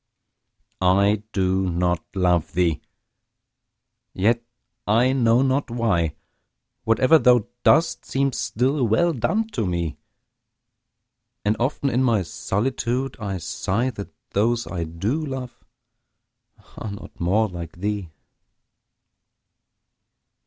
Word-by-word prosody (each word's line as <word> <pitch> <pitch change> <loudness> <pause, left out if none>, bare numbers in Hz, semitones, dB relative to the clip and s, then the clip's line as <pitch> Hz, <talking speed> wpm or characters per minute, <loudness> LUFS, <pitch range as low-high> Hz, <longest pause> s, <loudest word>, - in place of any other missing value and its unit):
I 100 +3 +3
do 95 -1 +1
not 90 -1 0
love 90 -4 +1
thee! 85 -3 +1 1.3
yet, 115 +5 +2 0.5
I 120 +5 +3
know 120 -1 +3
not 135 +1 0
why, 100 -10 0 0.7
Whate'er 130 +8 +5
thou 125 -6 +4 0.2
does 160 +2 +4
seems 135 -1 -1
still 130 +2 0
well 165 +11 +2
done, 200 - 0
to 120 - -2
me 85 -4 -2 1.5
And 105 +1 +2
often 135 +2 0
in 125 +3 +2
my 115 -6 +2
solitude 125 +8 -2
I 100 -3 -3
sigh 115 +8 -1
That 100 -4 -8 0.2
those 115 +3 +1
I 85 -3 -4
do 100 - -2
love 130 -4 -6 1.1
are 110 - -5
not 100 +2 -10
more 100 +6 +2
like 85 -4 -7
thee! 100 0 -3
110 Hz, 105 wpm, -23 LUFS, 95-130 Hz, 1.5 s, Whate'er